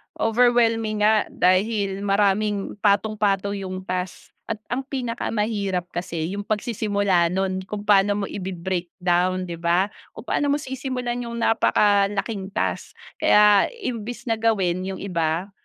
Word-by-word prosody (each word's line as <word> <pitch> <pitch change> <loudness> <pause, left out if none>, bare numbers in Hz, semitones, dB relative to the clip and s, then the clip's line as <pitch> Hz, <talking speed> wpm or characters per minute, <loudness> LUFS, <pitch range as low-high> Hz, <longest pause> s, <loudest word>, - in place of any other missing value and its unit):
overwhelming 225 -2 +2
nga 215 0 +4
dahil 195 +1 +1
maraming 200 0 0
patong-patong 200 -1 +1
yung 185 -1 -5
task 185 -1 -5 0.2
at 225 - 0 0.2
ang 250 +2 0
pinakamahirap 215 -6 -2
kasi 170 -1 -3
yung 205 - -3
pagsisimula 205 -5 +1
nun 190 +1 -1
kung 210 -1 -4
paano 205 0 +3
mo - - 0
ibi-breakdown 185 -1 -1
'di 170 -1 -7
ba, 175 +4 +2 0.2
kung 220 - -9
paano 290 - 0
mo 285 - +3
sisimulan 255 -3 -4
yung 235 0 -5
napakalaking 205 -2 +2
task. - - -2 0.3
Kaya, 210 -1 +6 0.2
imbes 240 -1 -4
na 230 - +1
gawin 195 -6 +1
yung 190 - -5
iba, 170 0 -2
200 Hz, 125 wpm, -23 LUFS, 185-220 Hz, 0.3 s, Kaya